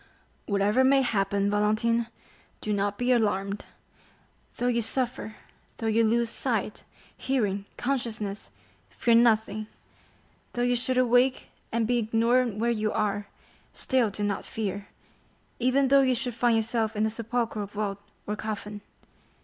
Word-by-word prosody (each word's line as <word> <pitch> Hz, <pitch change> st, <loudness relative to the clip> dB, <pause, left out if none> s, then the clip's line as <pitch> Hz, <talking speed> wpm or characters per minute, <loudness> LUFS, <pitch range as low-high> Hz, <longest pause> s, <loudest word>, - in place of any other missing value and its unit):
"Whatever 205 Hz, +4 st, +2 dB
may 270 Hz, +1 st, +5 dB
happen, 200 Hz, -3 st, +1 dB
Valentine, 215 Hz, +3 st, +1 dB, 0.5 s
do 210 Hz, -, -2 dB
not 205 Hz, 0 st, -1 dB
be 245 Hz, +2 st, +1 dB
alarmed; 205 Hz, -4 st, 0 dB, 0.9 s
though 245 Hz, -, -2 dB
you 240 Hz, -1 st, +2 dB
suffer; 240 Hz, -1 st, -2 dB, 0.4 s
though 225 Hz, -, -5 dB
you 225 Hz, +1 st, +3 dB
lose 235 Hz, +1 st, +2 dB
sight, -, -, -2 dB, 0.3 s
hearing, 205 Hz, -7 st, -1 dB
consciousness, 225 Hz, -6 st, -3 dB, 0.4 s
fear 235 Hz, -, +1 dB
nothing; 220 Hz, -2 st, +3 dB, 0.9 s
though 240 Hz, -, -1 dB
you 245 Hz, 0 st, +2 dB
should 250 Hz, +1 st, -1 dB
awake 250 Hz, +1 st, +3 dB, 0.2 s
and 230 Hz, 0 st, +1 dB
be 245 Hz, +2 st, +1 dB
ignorant 230 Hz, +1 st, +2 dB
where 235 Hz, +2 st, +1 dB
you 215 Hz, -2 st, 0 dB
are, 205 Hz, -1 st, -1 dB, 0.5 s
still 255 Hz, -4 st, +1 dB
do 205 Hz, +1 st, -5 dB
not 205 Hz, -1 st, -1 dB
fear; 205 Hz, -2 st, -4 dB, 0.7 s
even 255 Hz, +2 st, +2 dB
though 275 Hz, 0 st, +6 dB
you 260 Hz, -2 st, +2 dB
should 245 Hz, +1 st, -2 dB
find 235 Hz, 0 st, +2 dB
yourself 225 Hz, 0 st, 0 dB
in 210 Hz, +1 st, +1 dB
a 220 Hz, -, 0 dB
sepulchral 225 Hz, -2 st, -2 dB
vault 205 Hz, -1 st, -3 dB, 0.3 s
or 210 Hz, -, -2 dB
coffin. 210 Hz, -1 st, -5 dB
225 Hz, 140 wpm, -27 LUFS, 210-245 Hz, 0.9 s, though